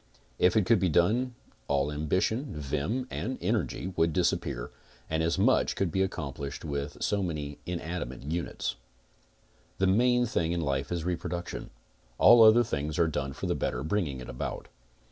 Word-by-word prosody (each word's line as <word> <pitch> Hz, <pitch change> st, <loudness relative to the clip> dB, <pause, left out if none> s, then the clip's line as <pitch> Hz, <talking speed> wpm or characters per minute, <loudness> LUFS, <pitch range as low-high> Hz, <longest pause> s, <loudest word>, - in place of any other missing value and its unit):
If 90 Hz, +3 st, +4 dB
it 105 Hz, -, +3 dB
could 115 Hz, -1 st, +4 dB
be 95 Hz, -, +2 dB
done 115 Hz, -, +2 dB, 0.3 s
all 70 Hz, 0 st, +1 dB
ambition, 95 Hz, -, -1 dB
vim 75 Hz, -, -2 dB
and 130 Hz, +3 st, -3 dB
energy 95 Hz, +1 st, -1 dB
would 80 Hz, -1 st, +2 dB
disappear, 80 Hz, -8 st, 0 dB, 0.4 s
and 80 Hz, 0 st, +1 dB
as 85 Hz, +2 st, +1 dB
much 115 Hz, +7 st, +3 dB
could 95 Hz, -4 st, 0 dB
be 95 Hz, -, +1 dB
accomplished 70 Hz, -6 st, -4 dB
with 70 Hz, -1 st, -4 dB
so 100 Hz, -1 st, +1 dB
many 75 Hz, -5 st, -4 dB
inanimate 85 Hz, -7 st, -4 dB
units: 85 Hz, +4 st, -3 dB, 1.0 s
The 95 Hz, -, +2 dB
main 125 Hz, +5 st, +4 dB
thing 85 Hz, -7 st, 0 dB
in 85 Hz, -, -1 dB
life 70 Hz, -1 st, -1 dB
is 85 Hz, -2 st, -1 dB
reproduction. 90 Hz, 0 st, -4 dB, 0.5 s
All 120 Hz, -1 st, +8 dB
other 110 Hz, +2 st, +8 dB
things 75 Hz, -8 st, -3 dB
are 85 Hz, -, +4 dB
done 70 Hz, -3 st, -2 dB
for -, -, -6 dB
the -, -, +1 dB
better -, -, -2 dB
bringing 80 Hz, -5 st, -1 dB
it 60 Hz, -, -8 dB
about. 60 Hz, -, -5 dB
85 Hz, 165 wpm, -29 LUFS, 75-100 Hz, 1.0 s, All